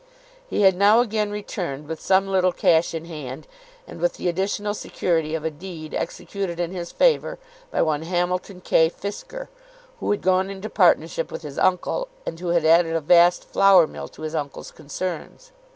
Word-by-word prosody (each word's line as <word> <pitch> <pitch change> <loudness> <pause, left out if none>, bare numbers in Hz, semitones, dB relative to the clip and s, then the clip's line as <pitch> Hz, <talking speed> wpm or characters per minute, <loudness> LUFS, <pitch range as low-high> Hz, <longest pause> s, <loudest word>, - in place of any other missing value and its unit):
He - - -1
had 190 -2 +6
now 205 +4 +5
again 215 -3 0
returned, 175 -8 -5
with 160 0 -6
some 190 0 +3
little 185 -1 +2
cash 165 -1 +2
in 165 0 -5
hand, 150 -4 -8 0.4
and - - -11
with - - +1
the - - -3
additional 200 +3 -1
security 160 -6 -1
of 160 -1 -4
a 160 - 0
deed 155 0 -9
executed 180 -1 -4
in 175 0 -1
his 175 -2 -6
favour - - +2 0.3
by - - +1
one 155 -2 0
Hamilton 180 +2 -2
K. 160 -2 +3
Fisker, 355 - -7 0.5
who - - -3
had 205 - 0
gone 185 +1 +2
into 195 +2 -7
partnership 165 -3 +2
with - - -7
his 145 -2 -6
uncle, 185 - +1 0.2
and 165 - -5
who 180 - -5
had 170 -2 +2
added 165 0 +4
a - - +2
vast 175 +3 +5
flour 195 -3 +5
mill - - -8
to - - -13
his 155 0 -4
uncle's 145 -3 -5
concerns. 180 - -6
175 Hz, 185 wpm, -23 LUFS, 160-195 Hz, 0.5 s, had